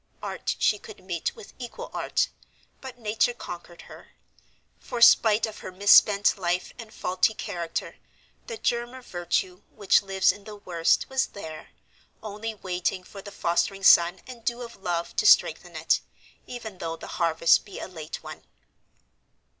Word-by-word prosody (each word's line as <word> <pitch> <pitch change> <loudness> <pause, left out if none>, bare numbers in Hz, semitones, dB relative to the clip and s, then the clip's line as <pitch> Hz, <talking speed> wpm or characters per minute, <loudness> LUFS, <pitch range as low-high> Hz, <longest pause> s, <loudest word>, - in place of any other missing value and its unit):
Art - - -3
she 210 - +2
could - - -12
meet 175 -3 -3
with 200 - -13
equal 245 -2 -8
art, - - 0 0.5
but 260 -2 -9
nature 225 +1 0
conquered 175 -5 -9
her. - - -14 0.7
For 245 - -6
spite 220 -2 +6
of 220 -1 -9
her - - -8
misspent 200 +1 +5
life 180 0 -1
and 225 -2 -9
faulty 185 +2 0
character, 175 -6 -5 0.5
the 465 - -5
germ 240 - -1
of 260 -1 -12
virtue, 180 +1 -2
which 200 -3 +3
lives 195 -1 +2
in 205 -1 -14
the 215 - -8
worst, 175 -5 +1
was 265 0 0
there, 160 -5 -9 0.5
only 215 +1 -5
waiting 185 -1 -3
for 195 +2 -11
the 205 - -10
fostering 175 +3 -1
sun 175 0 +6
and 245 -3 -11
dew 240 +1 -2
of 235 -1 -10
love 175 -3 -3
to - - +3
strengthen - - +4
it, - - +2 0.5
even 220 -6 -8
though 165 0 -4
the - - -10 0.2
harvest 165 0 +4
be 200 - -11
a - - -6
late 160 -4 -8
one. - - -9
200 Hz, 160 wpm, -26 LUFS, 175-225 Hz, 0.7 s, spite